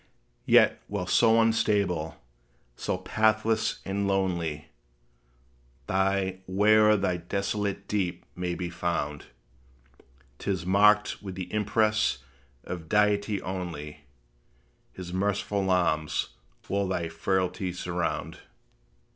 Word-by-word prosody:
Yet, -, -, +5 dB
while 100 Hz, -3 st, -3 dB
so 115 Hz, +4 st, +4 dB
unstable, 100 Hz, -7 st, +1 dB, 0.6 s
so 90 Hz, -, -2 dB
pathless 110 Hz, +3 st, +1 dB
and 100 Hz, +1 st, -1 dB
lonely, 85 Hz, -6 st, -1 dB, 1.2 s
Thy 95 Hz, +1 st, 0 dB
way 105 Hz, +3 st, +4 dB
o'er 105 Hz, 0 st, +6 dB
that 90 Hz, -3 st, -2 dB
desolate 100 Hz, 0 st, -2 dB
deep 90 Hz, -4 st, -2 dB
may 90 Hz, -1 st, -2 dB
be 90 Hz, -1 st, -4 dB
found, 75 Hz, -4 st, -2 dB, 1.1 s
'T -, -, -5 dB
is 95 Hz, -3 st, -1 dB
marked 105 Hz, +3 st, +4 dB
with 95 Hz, -3 st, -7 dB
the 90 Hz, 0 st, -6 dB
impress 105 Hz, -3 st, +2 dB, 0.5 s
of 80 Hz, -3 st, -7 dB
Deity 105 Hz, -1 st, +2 dB
only; 85 Hz, -6 st, -6 dB, 0.9 s
His 90 Hz, -1 st, -8 dB
merciful 100 Hz, 0 st, 0 dB
arms 80 Hz, -4 st, +1 dB, 0.4 s
will 100 Hz, +1 st, 0 dB
thy 85 Hz, -3 st, -1 dB
frailty 90 Hz, +2 st, -1 dB
surround. 90 Hz, -1 st, -3 dB
95 Hz, 105 wpm, -27 LUFS, 90-105 Hz, 1.2 s, o'er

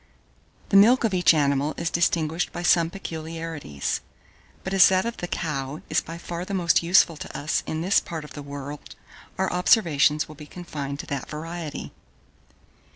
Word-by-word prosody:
The 200 Hz, -, +5 dB
milk 235 Hz, +6 st, +6 dB
of 220 Hz, -4 st, +1 dB
each 180 Hz, -1 st, +5 dB
animal 145 Hz, -1 st, +1 dB
is 170 Hz, 0 st, -2 dB
distinguished 165 Hz, 0 st, 0 dB
by 175 Hz, -, -6 dB
some 170 Hz, -2 st, +4 dB
peculiarities; 160 Hz, -, -5 dB, 0.6 s
but 190 Hz, -, -4 dB
as 195 Hz, -, +7 dB
that 185 Hz, +1 st, +2 dB
of 235 Hz, -, -4 dB
the 175 Hz, -, -4 dB
cow 145 Hz, -3 st, -4 dB
is -, -, +3 dB
by 165 Hz, +1 st, -8 dB
far 170 Hz, 0 st, -5 dB
the 195 Hz, +2 st, -4 dB
most 175 Hz, -3 st, +3 dB
useful 170 Hz, -1 st, +4 dB
to -, -, -7 dB
us 145 Hz, -, -1 dB
in 160 Hz, -, -3 dB
this 185 Hz, +4 st, +3 dB
part 160 Hz, -2 st, -6 dB
of -, -, -12 dB
the 145 Hz, -, -7 dB
world, 140 Hz, 0 st, -8 dB, 0.4 s
our 190 Hz, -1 st, 0 dB
observations 165 Hz, -, +3 dB
will 155 Hz, -, -10 dB
be 150 Hz, 0 st, -12 dB
confined 145 Hz, -6 st, -6 dB
to -, -, -13 dB
that 140 Hz, -3 st, -5 dB
variety. 165 Hz, 0 st, -6 dB
165 Hz, 175 wpm, -25 LUFS, 150-180 Hz, 0.6 s, as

